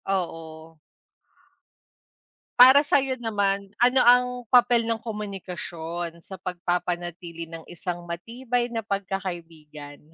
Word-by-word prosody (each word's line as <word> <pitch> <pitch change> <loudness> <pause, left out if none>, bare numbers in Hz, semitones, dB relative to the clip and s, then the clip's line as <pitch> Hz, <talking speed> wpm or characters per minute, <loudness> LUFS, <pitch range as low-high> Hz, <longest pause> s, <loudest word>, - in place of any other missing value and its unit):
Oo. 165 -4 -4 1.8
Para 260 +3 +9
sa'yo 270 -3 +1
naman, 200 -4 -1
ano 250 +2 +4
ang 245 +1 +6 0.3
papel 245 -2 +5
ng 230 0 -1
komunikasyon 175 -6 -6
sa 190 +3 -10
pagpapanatili 175 -2 -4
ng 165 0 -9
isang 175 0 -5
matibay 235 +8 -3
na 230 -2 -4
pagkakaibigan? 170 -7 -6
190 Hz, 95 wpm, -25 LUFS, 170-230 Hz, 1.8 s, Para